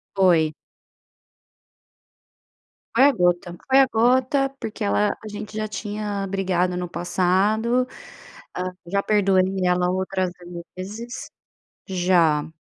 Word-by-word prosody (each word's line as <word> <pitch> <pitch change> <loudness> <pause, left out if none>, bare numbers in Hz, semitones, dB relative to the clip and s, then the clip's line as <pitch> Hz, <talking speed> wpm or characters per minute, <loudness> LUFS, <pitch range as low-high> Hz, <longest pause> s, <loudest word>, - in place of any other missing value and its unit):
Foi. 170 -5 +4 2.4
Foi 260 - +6
a 285 - +6
gota 175 -5 0
foi 265 +1 +6
a 265 - +6
gota. 260 +4 +3
Porque 215 - -5
ela 100 +1 +2
a - - -7
gente 210 0 -7
já 215 0 -2
tinha 205 -1 -4
brigado 185 -2 0
no 180 0 -3
passado, 205 +8 +1 0.7
hã, 185 0 -2 0.2
já 200 +2 0
perdoei 195 -3 +3 0.2
ela 180 0 +2
outras 185 0 -1 0.5
vezes 215 +6 -7 0.6
Já, 175 -5 +2
190 Hz, 110 wpm, -23 LUFS, 180-215 Hz, 2.4 s, Foi